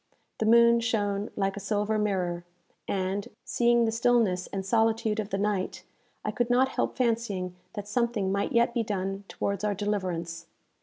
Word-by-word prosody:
The 220 - +1
moon 235 +1 +6
shone 205 -3 -1
like 195 -1 0
a - - -5
silver 210 +2 0
mirror, 180 -4 -1 0.4
and, 195 +1 -1 0.2
seeing 235 -1 +3
the 225 - +1
stillness 225 -5 +2
and 195 -1 -4
solitude 220 0 +2
of 210 -1 -3
the 195 - -1
night, 200 -2 -1 0.4
I - - 0
could 240 0 -1
not 255 +2 +4
help - - -2
fancying 225 -7 -1 0.2
that 205 0 -6
something 220 -3 0
might 200 +1 0
yet 235 0 +3
be 235 - +1
done 195 -2 -3
towards 200 0 -3
our 210 -1 +1
deliverance. 180 -5 -3
210 Hz, 165 wpm, -28 LUFS, 195-230 Hz, 0.4 s, moon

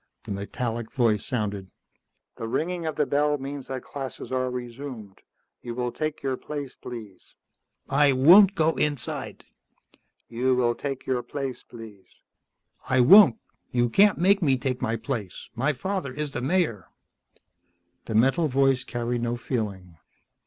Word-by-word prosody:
The - - -8
metallic 115 +3 -4
voice 115 -5 +1
sounded. 100 -5 -3 0.7
"The 115 - -5
ringing 165 +7 -2
of 155 - -3
the 150 - +1
bell 150 +1 +1
means 140 0 -7
that 130 -1 -5
classes 135 -2 -7
are 130 0 0
resumed. 120 -4 -7 0.4
You 120 -1 -6
will 125 0 -2
take 155 +1 -4
your 135 -1 -1
place, 145 -3 -6
please." 110 -6 -10 0.5
"I 145 0 +4
won't 180 +10 +7
go 160 -3 +3
inside." 145 -4 -3 0.8
"You 125 +2 +1
will 120 -1 +2
take 135 +1 -5
your 125 -2 0
place, 135 -1 -5
please." 110 -5 -13 0.8
"I 130 -1 +3
won't. 140 - +8 0.3
You 120 -1 +1
can't 200 - +4
make 195 +3 +3
me 135 -6 +3
take 125 0 -3
my 115 - 0
place. 110 -5 -5
My 130 +5 +1
father 185 +1 -3
is 150 +2 -4
the 120 - -4
Mayor." 135 - 0 1.2
The 110 - -4
metal 135 +8 +3
voice 135 -1 +2
carried 120 0 -3
no 120 0 -1
feeling. 100 -9 -4
130 Hz, 145 wpm, -25 LUFS, 115-145 Hz, 1.2 s, won't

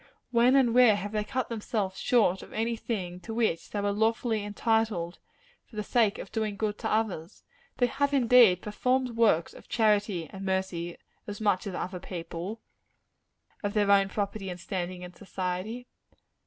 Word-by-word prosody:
When 245 +2 +5
and 255 -4 +4
where 245 -4 +7
have 205 0 -4
they 210 -1 -1
cut 250 +3 -2
themselves 210 -4 -3
short 210 -7 +3
of - - -12
any 230 +1 0
thing 185 -6 -4
to 225 +4 -7
which 220 -8 0
they 205 - -3
were 205 0 +1
lawfully 220 +1 +1
entitled, 205 -4 0 0.5
for 230 - -17
the 210 - -2
sake 220 -2 +2
of - - -8
doing 215 -2 -2
good 210 0 -2
to - - -2
others? 210 -5 -2 0.3
They 245 - +4
have, 280 +3 0
indeed, 240 -8 +5
performed 250 +4 0
works 225 -8 +2
of - - -15
charity 210 -6 +1
and 195 0 -7
mercy, 190 -3 -2 0.3
as 205 0 -6
much 205 -2 +1
as 190 - -4
other 180 0 -4
people 180 +3 -6 1.0
of 205 0 -3
their 205 -1 +3
own 195 -1 +5
property 200 -1 -3
and 180 0 -6
standing 180 -1 -4
in 180 0 -9
society. 190 +5 -4
210 Hz, 170 wpm, -28 LUFS, 190-230 Hz, 1.0 s, where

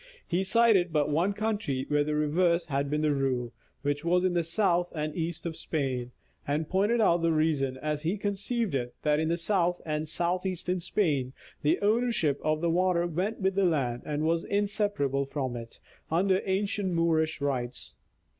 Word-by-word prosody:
He 180 +2 0
cited 205 -3 +4
but 150 -2 +1
one 170 +7 +2
country 205 -11 -2
where 145 0 +2
the 150 +1 -2
reverse 170 +3 +2
had 140 -2 -1
been 150 +1 0
the 150 -1 +3
rule, 130 -4 -1 0.3
which 145 +1 -1
was 180 +2 +2
in 185 -1 +2
the 175 - +2
south 175 +1 +1
and 150 0 -3
east 170 0 -3
of 165 -1 -3
Spain, 130 -7 -2 0.4
and 150 +2 0
pointed 205 +7 +2
out 175 -6 +3
the 165 0 +2
reason, 150 -4 +1
as 150 +1 -2
he 170 +6 -1
conceived 205 - -2
it, 125 -2 -2
that 150 0 +2
in 160 +2 0
south 175 0 +1
and 155 0 -2
south 175 +2 0
eastern 185 -1 -2
Spain 145 -9 0 0.3
the 150 - +3
ownership 210 - +1
of 155 0 +1
the 170 - +1
water 180 0 +2
went 185 +6 -2
with 190 0 +2
the 195 +1 +1
land 135 -9 +1
and 150 0 -2
was 165 +1 +1
inseparable 200 -10 0
from 135 -3 -3
it, 115 -1 -8 0.3
under 185 +3 +2
ancient 195 0 0
Moorish 160 -2 +1
rights. 130 - -3
165 Hz, 180 wpm, -28 LUFS, 145-185 Hz, 0.4 s, cited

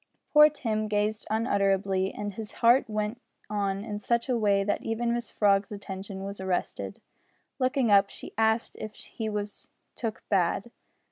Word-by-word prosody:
Poor 300 0 +9
Tim 220 -7 -2
gazed 210 +1 -1
unutterably, 195 -3 +1
and 205 -1 -5
his 215 0 -7
heart 240 +1 +4
went 215 +3 -2 0.3
on 200 -1 -1
in 205 -2 -4
such 235 +4 0
a 250 - +3
way 200 -3 +3
that 205 +1 0
even 235 +1 -1
Mrs 235 0 -2
Frog's 200 -1 +3
attention 195 -1 -6
was 200 0 -6
arrested. 190 -1 -2 0.6
Looking 255 -3 +2
up, 200 0 +6
she - - -10
asked 220 +1 +1
if 215 0 -7
he 220 -2 -5
was 210 -1 -5 0.3
took 225 -3 -4
bad. 195 +3 +1
210 Hz, 155 wpm, -28 LUFS, 200-230 Hz, 0.6 s, Poor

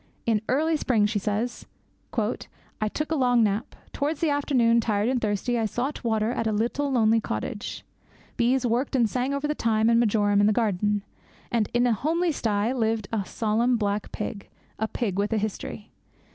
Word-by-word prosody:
'In 220 -3 +2
early 315 +5 +2
spring,' 230 -7 +2
she 210 0 0
says, 215 +4 -2 0.4
'I 215 - -4
took 305 +1 -3
a - - +2
long 245 -4 +3
tramp. 210 +2 -1 0.2
Towards 300 +4 -2
afternoon, 270 -6 +3
tired 210 -1 0
and 255 -2 0
thirsty, 215 +3 0
I 220 - +1
sought 255 +8 -3
water 220 -1 +1
at 230 -2 -1
a - - +1
little 240 +7 0
lonely 225 -3 +3
cottage. 155 - -5 0.5
Bees 250 +2 +2
worked 245 +4 0
and 240 -3 +4
sang 250 +4 -1
over 280 +1 -1
the 300 - 0
thyme 225 -4 +2
and 230 - +4
marjoram 205 -3 +3
in 205 - +5
the 215 - +3
garden; 205 -2 0 0.5
and 225 -3 +1
in 240 +1 +2
a 240 - +3
homely 330 - 0
sty 215 -4 0
lived 225 -4 -1
a 210 -3 0
solemn 230 +3 +1
black 205 -1 -2
pig, 205 -1 -5 0.3
a 220 - 0
pig 200 -4 -2
with 205 +2 0
a - - +2
history. 215 0 -4
230 Hz, 185 wpm, -26 LUFS, 210-250 Hz, 0.5 s, in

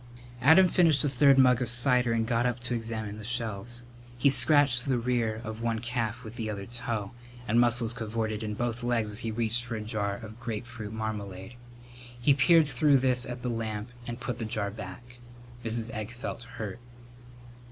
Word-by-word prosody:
Adam 160 +8 +7
finished 165 -5 +4
a - - +2
third 135 +1 +5
mug 125 -2 +5
of 120 - -1
cider 125 0 +3
and 115 -1 +1
got 115 0 +1
up 125 0 0
to 120 +1 -3
examine 110 -2 -4
the - - -8
shelves. 120 0 -3 0.3
He 135 +3 +4
scratched 135 -1 +4
the 130 -2 +2
rear 115 -2 0
of 110 +1 -6
one 115 -1 0
calf 120 0 -3
with 110 +1 -9
the 110 -3 -3
other 100 -2 -4
toe, 115 -4 -4 0.4
and 115 +3 +3
muscles 120 -1 +2
cavorted 110 -1 -3
in 105 -1 -3
both 120 +1 -2
legs 120 -3 0
as 105 - -3
he 115 - -3
reached 115 +1 -1
for 120 -1 -5
a 110 - -4
jar 105 -2 -2
of 110 +1 -10
grapefruit 120 -1 -6
marmalade. 105 -2 -5 0.7
He 140 +4 +4
peered 160 +4 +5
through 145 -1 +3
this 125 -1 +1
at 125 0 -6
the 125 - -1
lamp 110 -1 -4 0.2
and 120 +1 -5
put 120 -1 -4
the 115 - -3
jar 105 -2 -2
back. 115 +4 -10 0.5
Mrs. 115 0 -1
Egg 110 +1 -5
felt 120 0 -6
hurt. 115 -3 -6
120 Hz, 190 wpm, -28 LUFS, 110-125 Hz, 0.7 s, Adam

